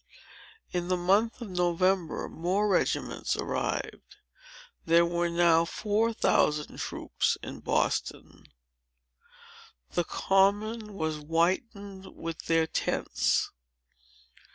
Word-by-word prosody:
In 175 -1 -2
the 185 0 +1
month 200 +7 +2
of 210 - -8
November, 180 0 +1
more 185 +6 0
regiments 195 - 0
arrived. - - -3 0.7
There 170 +1 +4
were 170 0 0
now 170 -1 +4
four 215 +6 0
thousand 150 -8 +1
troops - - -1
in - - -7
Boston. - - -2 1.5
The 175 - +1
Common 205 +4 +1
was 160 -4 -2
whitened 190 +5 -2
with 165 -1 -6
their 165 -1 +3
tents. 160 - 0
180 Hz, 95 wpm, -28 LUFS, 165-200 Hz, 1.5 s, There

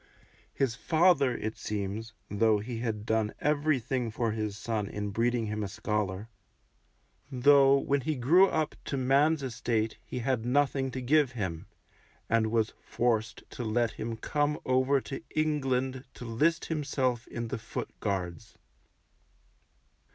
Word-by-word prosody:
His 135 -4 0
father, 155 -2 +3
it 110 0 -4
seems, 105 +2 -4
though 110 +1 +3
he 115 +3 -5
had 110 -3 -3
done 110 -1 0
everything 140 -5 0
for 115 0 -1
his 105 -2 -3
son 110 -2 -2
in 105 0 -4
breeding 115 +2 +1
him 105 0 -3
a - - -2
scholar, 105 0 -2 1.0
though 135 +1 +6
when 140 0 0
he 155 +4 -1
grew 165 +10 +5
up 155 -4 -1
to 140 - -2
man's 140 +4 +3
estate 115 -3 -1
he - - -7
had 125 -1 0
nothing 135 +1 +1
to 130 0 -5
give 140 0 +3
him, 95 -8 -4 0.6
and 115 -1 +2
was 110 -1 +1
forced 115 -1 -1
to 125 - -5
let 115 +1 +1
him 115 0 -5
come 145 +5 0
over 130 +2 +3
to 135 - -6
England 135 -4 0
to 120 - -8
list 150 +9 +1
himself 135 -6 -1
in 120 -1 -5
the 130 - -3
Foot 115 - -5
Guards. 90 -5 -3
120 Hz, 145 wpm, -29 LUFS, 110-140 Hz, 1.0 s, though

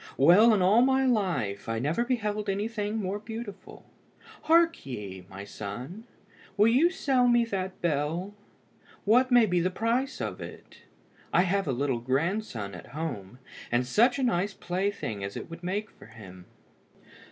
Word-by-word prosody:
Well, 180 - +7
in 205 -4 +3
all 205 +6 +5
my 265 +1 +3
life, 170 - -1
I 115 - -1
never 150 - 0
beheld 210 -4 -2
anything 210 +1 -2
more 200 -1 -2
beautiful. 220 -1 -9 0.6
Hark 335 +1 +4
ye, 100 -8 -7
my 95 +1 -8
son, 125 - -7 0.5
will 210 +2 +5
you 275 +9 +4
sell 270 -9 +1
me 240 -1 +4
that 190 -4 -4
bell? 165 +5 -1 0.7
What 245 +5 +4
may 245 -2 +6
be 180 -3 +1
the 175 +2 +1
price 230 +7 -1
of - - -4
it? - - -11 0.5
I 175 - +4
have 195 0 0
a - - +1
little 130 -1 -1
grandson 130 - -2
at 90 - -10
home, 120 -9 -5 0.3
and 120 +1 +2
such 235 - +3
a 270 - -1
nice 195 -4 0
plaything 180 - -3
as 100 0 -5
it - - -8
would 165 +1 -9
make 200 +4 -3
for - - -16
him!" 95 -5 -13
190 Hz, 160 wpm, -28 LUFS, -, 0.7 s, Well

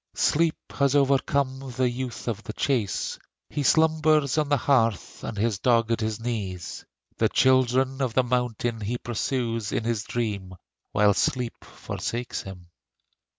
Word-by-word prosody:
Sleep 160 +1 +2 0.2
has 140 0 +1
overcome 135 -1 +1
the 130 -1 +3
youth 125 0 -4
of 110 -2 -2
the 110 - -7
chase: 115 -9 -1 0.3
He 150 - -2
slumbers 155 -1 +3
on 150 -2 0
the 145 - +4
heath, 115 - +1
and 105 - -5
his 105 -1 0
dog 115 -1 +3
at 115 - +1
his 110 0 -2
knee. 110 -6 -3 0.6
The - - +3
children 130 +1 +3
of 125 -4 -1
the 130 - +4
mountain 120 -2 -1
he 115 +4 -2
pursues 115 -2 -2
In - - -1
his 115 -2 -1
dream, 100 -6 -3 0.4
while 105 0 +4
sleep 125 +3 -1
forsakes 120 +1 -4
him. 90 -3 -11
120 Hz, 150 wpm, -26 LUFS, 110-135 Hz, 0.6 s, the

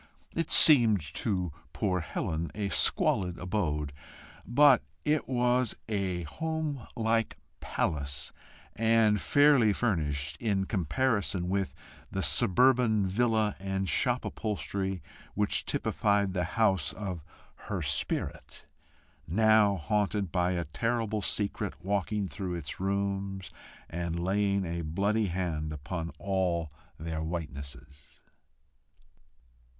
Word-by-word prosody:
It 165 - -2
seemed 120 -9 +8
to 90 -6 -1 0.2
poor 90 0 0
Helen 80 0 -3
a 100 -1 -2
squalid 90 -2 +3
abode, 75 -7 -2 0.5
but 135 +2 +6 0.2
it 150 -2 0
was 125 -1 +1
a 95 -5 -2
home 155 - -4
like 115 -1 0 0.2
palace, 70 -2 -2 0.4
and 110 -2 +3
fairly 145 -7 +5
furnished, 75 -9 -1
in 100 -2 0
comparison 100 - 0
with 95 0 -1 0.3
the - - -3
suburban 120 -1 +4
villa 110 +1 +1
and 95 0 -2
shop - - +1
upholstery 95 -3 -3 0.3
which 105 0 0
typified 100 -2 +1
the 90 -2 0
house 100 -6 +2
of 95 -6 -5 0.5
her - - -2
spirit - - -2 0.6
now 110 +2 +4
haunted 100 +1 -1
by 90 -1 +1
a 85 -1 -2
terrible 110 +5 -1
secret 100 +1 -2
walking 100 +1 -1
through 90 +3 -5
its 75 -4 -6
rooms, 95 0 -2 0.4
and 85 0 -3
laying 100 +2 +1
a 85 0 -3
bloody 100 +7 0
hand 85 -4 -2
upon 80 +3 -5
all 90 -5 -1 0.3
their 80 0 -4
whitenesses. 70 -4 -7
95 Hz, 105 wpm, -29 LUFS, 85-110 Hz, 0.6 s, seemed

